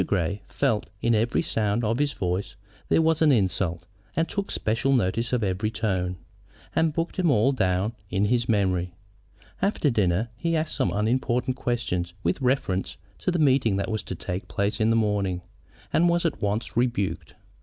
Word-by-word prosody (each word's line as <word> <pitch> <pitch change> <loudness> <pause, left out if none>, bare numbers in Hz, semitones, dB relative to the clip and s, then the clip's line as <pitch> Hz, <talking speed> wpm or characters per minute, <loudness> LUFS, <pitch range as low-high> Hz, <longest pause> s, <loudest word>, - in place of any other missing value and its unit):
Grey 100 +1 0
felt 110 -1 0
that - - -28
in 120 - +3
every 115 +2 +2
sound 105 +1 0
of 115 +3 0
his 145 -1 +1
voice 90 +2 -2 0.3
there 165 - +4
was 160 0 +2
an 155 -2 +6
insult, 95 -6 0 0.3
and 165 +1 +1
took 200 -1 -3
special 115 +5 0
notice 115 0 +1
of 125 -3 +1
every 100 +2 0
tone, 95 -5 -1 0.6
and 160 -1 +3
booked 165 +2 -3
them 180 -3 +2
all 130 0 +4
down 100 -3 0 0.2
in 100 +2 +1
his 120 +2 +1
memory. 90 -4 +1 0.7
After 190 -7 +2
dinner 105 0 +1
he 165 +7 -1
asked 155 0 -1
some 130 - +1
unimportant 125 +4 0
question 115 -9 -1 0.2
with 85 +9 0
reference 125 -8 0 0.2
to - - -1
the 175 - +1
meeting 130 - +3
that 100 +3 -1
was 110 - -1
to 95 - -6
take 90 +3 -5
place 100 +2 -1
in 110 - +3
the 115 - +3
morning, 100 -5 0 0.5
and 175 +1 +4
was 170 0 +1
at 165 - -1
once 105 +3 -2
rebuked. 115 -8 -1
110 Hz, 180 wpm, -26 LUFS, 95-130 Hz, 0.7 s, an